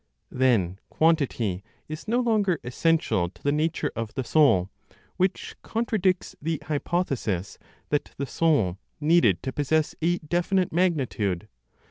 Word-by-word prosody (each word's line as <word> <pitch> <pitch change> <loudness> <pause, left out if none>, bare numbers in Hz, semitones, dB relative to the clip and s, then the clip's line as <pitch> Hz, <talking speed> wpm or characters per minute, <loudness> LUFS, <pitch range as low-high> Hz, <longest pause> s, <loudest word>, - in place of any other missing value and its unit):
Then 110 -8 +2
quantity 130 - +1 0.2
is 155 +5 -7
no 240 +3 +2
longer 210 -8 +1
essential 125 - +1
to 85 - -23
the 145 - +2
nature 155 0 0
of 115 -2 -5
the 130 - -1
soul; 110 - +3 0.5
which 185 0 -1
contradicts 210 -5 0
the 160 +1 -1
hypothesis 140 - -2 0.3
that 145 - -1
the 140 - -2
soul 135 - +1 0.2
needed 150 - +3
to 130 - -3
possess 150 +2 +1
a 175 +2 +2
definite 175 +3 0
magnitude. 135 - 0
150 Hz, 125 wpm, -26 LUFS, 115-175 Hz, 0.5 s, soul